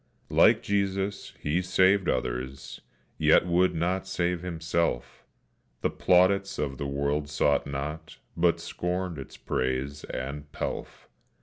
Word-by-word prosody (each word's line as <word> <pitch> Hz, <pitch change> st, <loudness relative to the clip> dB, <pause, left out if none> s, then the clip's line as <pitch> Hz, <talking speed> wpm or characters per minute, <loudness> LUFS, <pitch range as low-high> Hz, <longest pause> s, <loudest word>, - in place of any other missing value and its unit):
Like -, -, +5 dB
Jesus, 100 Hz, 0 st, -1 dB
he 80 Hz, +5 st, 0 dB
saved 95 Hz, +1 st, +3 dB
others, 65 Hz, +2 st, -3 dB, 0.4 s
yet -, -, +5 dB
would 90 Hz, +1 st, +2 dB
not 90 Hz, +3 st, -1 dB
save 90 Hz, -2 st, -1 dB
himself; 80 Hz, -5 st, -2 dB, 0.6 s
The -, -, +1 dB
plaudits 100 Hz, +2 st, +3 dB
of 70 Hz, -3 st, -3 dB
the 70 Hz, -, -2 dB
world 70 Hz, +1 st, -1 dB
sought 70 Hz, -1 st, +2 dB
not, 75 Hz, +3 st, -5 dB, 0.2 s
but 85 Hz, 0 st, +3 dB
scorned 90 Hz, -2 st, -3 dB
its 65 Hz, -, -9 dB
praise 65 Hz, +3 st, -2 dB
and 70 Hz, +3 st, -6 dB
pelf. -, -, -5 dB
85 Hz, 120 wpm, -28 LUFS, 70-90 Hz, 0.6 s, Like